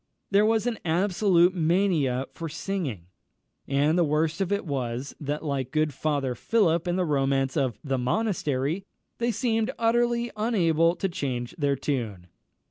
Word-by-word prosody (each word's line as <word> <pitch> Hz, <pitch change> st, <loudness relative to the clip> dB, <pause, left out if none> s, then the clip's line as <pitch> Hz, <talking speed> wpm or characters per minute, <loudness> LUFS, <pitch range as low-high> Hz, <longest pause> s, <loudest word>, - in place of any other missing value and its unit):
There 205 Hz, +2 st, +5 dB
was 225 Hz, 0 st, +2 dB
an 240 Hz, -2 st, -1 dB
absolute 180 Hz, +1 st, +3 dB
mania 160 Hz, -7 st, +1 dB
for 165 Hz, -1 st, -5 dB
singing; 155 Hz, -, -4 dB, 0.6 s
and 145 Hz, +5 st, +2 dB
the -, -, +5 dB
worst 155 Hz, +3 st, 0 dB
of 195 Hz, 0 st, -1 dB
it 200 Hz, -1 st, 0 dB
was, 130 Hz, -2 st, -3 dB
that, 150 Hz, +1 st, -3 dB
like 135 Hz, -3 st, -2 dB
good 155 Hz, +1 st, 0 dB
Father 140 Hz, -2 st, -1 dB
Philip 170 Hz, -, +1 dB
in 175 Hz, -, +1 dB
the 185 Hz, -1 st, +1 dB
romance 135 Hz, -3 st, +1 dB
of 135 Hz, -6 st, 0 dB
The 135 Hz, -3 st, -1 dB
Monastery, 155 Hz, -, -1 dB, 0.4 s
they 235 Hz, 0 st, +1 dB
seemed 225 Hz, -1 st, 0 dB
utterly 235 Hz, +1 st, +1 dB
unable 170 Hz, -7 st, +2 dB
to 195 Hz, -, -1 dB
change 130 Hz, -8 st, -3 dB
their 145 Hz, -4 st, +1 dB
tune. 115 Hz, -10 st, -3 dB
160 Hz, 150 wpm, -26 LUFS, 135-195 Hz, 0.6 s, There